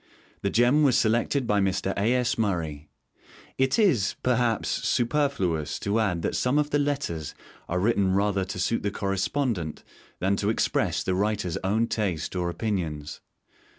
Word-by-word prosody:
The 100 - 0
gem 120 +8 +4
was 135 -5 +4
selected 120 +4 +1
by 105 -2 +2
Mr. 95 0 0
A. 105 +4 +1
S. 125 -2 +1
Murray. 80 -9 -2 0.7
It 130 0 +2
is, 160 - +3
perhaps, 120 -3 +1
superfluous 115 - 0
to 100 +3 0
add 90 -6 0
that - - -1
some 125 +3 +1
of 150 0 +1
the 145 - +2
Letters 140 - -2 0.3
are 90 - 0
written 100 -2 +2
rather 100 -1 +1
to 90 - -6
suit 105 +6 0
the 100 - -1
Correspondent 95 - -2 0.3
than 95 +2 +1
to 100 - 0
express 110 - 0
the 95 - 0
writer's 100 -2 -1
own 105 +5 +2
taste 95 -8 -2
or 90 -1 -1
opinions. 85 -6 -3
100 Hz, 155 wpm, -26 LUFS, 90-120 Hz, 0.7 s, gem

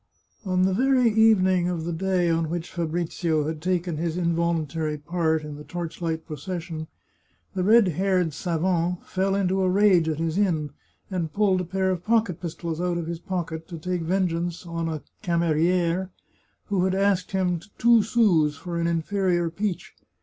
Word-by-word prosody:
On 185 -1 +1
the 190 0 +2
very 255 +1 +3
evening 190 -5 +4
of 170 -3 -2
the 170 - -2
day 185 +1 +1
on 165 -1 +1
which 170 0 -4
Fabrizio 165 -1 -1
had 155 -1 -4
taken 175 -2 -1
his 165 +1 -2
involuntary 165 -3 0
part 160 0 0
in 150 -1 -7
the 150 - -9
torch 170 +1 -6
light 160 -1 -2
procession, 160 +1 -5 0.7
the 185 - -1
red 220 +1 +6
haired 180 -1 +1
savant 175 +1 -1
fell 195 +1 0
into 190 -1 +1
a 185 - +2
rage 185 -4 +4
at 155 - -1
his 165 +3 -1
inn, 160 -8 +1 0.4
and 170 -4 -2
pulled 200 -3 +2
a - - -4
pair 190 +2 0
of 180 -2 -3
pocket 215 -6 +1
pistols 165 -1 -4
out 180 -1 0
of 170 - -3
his 170 0 -4
pocket 165 -3 -4
to 170 - -7
take 180 +2 -2
vengeance 175 -1 -1
on 165 -1 -3
a 155 -2 -4 0.2
camerier 170 +2 +1 0.6
who 195 -3 0
had 190 0 +1
asked 195 -2 +1
him 180 -2 +1 0.2
two 235 -1 +5
sous 195 - +2
for 175 0 -4
an 170 - +1
inferior 175 0 0
peach. 195 0 -3
175 Hz, 170 wpm, -25 LUFS, 165-190 Hz, 0.7 s, red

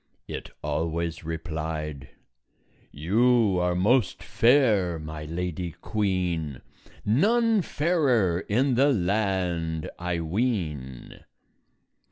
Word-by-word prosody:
it - - -6
always 80 +3 -2
replied, 80 -3 -5 0.8
"You 105 +5 +2
are 90 0 +1
most 105 +3 +2
fair, 110 - +3
my 75 0 -7
Lady 85 +1 -4
Queen; 90 - -1 0.4
None 220 - +3
fairer 140 - +1
in 130 +6 +2
the 135 +4 +4
land, 90 - -1
I 90 -1 -2
ween." 80 - -3
90 Hz, 85 wpm, -26 LUFS, 80-115 Hz, 0.8 s, the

